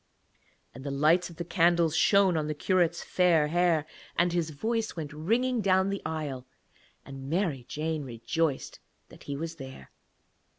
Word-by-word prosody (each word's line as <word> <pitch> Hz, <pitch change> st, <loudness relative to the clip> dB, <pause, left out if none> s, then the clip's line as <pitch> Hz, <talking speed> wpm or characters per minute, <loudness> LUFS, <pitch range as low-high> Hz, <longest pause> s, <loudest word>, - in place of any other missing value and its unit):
And 130 Hz, -, -10 dB
the 140 Hz, -, -4 dB
light 155 Hz, +6 st, +3 dB
of 170 Hz, -, -12 dB
the 170 Hz, +1 st, -5 dB
candles 170 Hz, -2 st, +3 dB
shone 200 Hz, -2 st, +4 dB
on 155 Hz, -1 st, -1 dB
the 155 Hz, -, -2 dB
curate's 175 Hz, +1 st, +1 dB
fair 170 Hz, -5 st, +3 dB
hair, 170 Hz, -2 st, +2 dB, 0.3 s
and 175 Hz, +1 st, +2 dB
his 170 Hz, -2 st, 0 dB
voice 220 Hz, +9 st, -2 dB
went 155 Hz, -2 st, -6 dB
ringing 230 Hz, +10 st, 0 dB
down 190 Hz, 0 st, +3 dB
the 200 Hz, -, -3 dB
aisle, 145 Hz, -5 st, -4 dB, 0.6 s
and 135 Hz, 0 st, -8 dB
Mary 160 Hz, -8 st, -1 dB
Jane 155 Hz, 0 st, -2 dB
rejoiced 135 Hz, +4 st, -2 dB, 0.3 s
that -, -, -15 dB
he 140 Hz, -, -4 dB
was 165 Hz, +2 st, -5 dB
there. 130 Hz, -, -10 dB
165 Hz, 160 wpm, -28 LUFS, 145-180 Hz, 0.6 s, shone